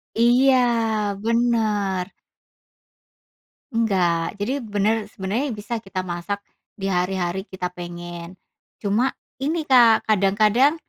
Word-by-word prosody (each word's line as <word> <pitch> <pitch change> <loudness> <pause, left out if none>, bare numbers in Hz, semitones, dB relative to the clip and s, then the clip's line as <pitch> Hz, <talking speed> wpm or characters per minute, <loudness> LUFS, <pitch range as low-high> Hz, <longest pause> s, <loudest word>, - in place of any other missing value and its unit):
Iya. 245 +4 +5 0.7
Bener. 215 -5 +1 1.6
Enggak. 185 -6 +1
Jadi 250 +8 -2
bener 210 +1 0
sebenarnya 210 +7 -3
bisa 215 +3 -4
kita 195 -3 -5
masak 180 +3 -4 0.3
di 195 -1 -3
hari-hari 180 +1 -1
kita 180 -1 -5
pengen. 175 0 -8 0.5
Cuma, 210 +6 +2 0.3
ini 310 +4 -1
Kak, 245 -5 +5
kadang-kadang 215 - +3
205 Hz, 95 wpm, -22 LUFS, 185-230 Hz, 1.6 s, Iya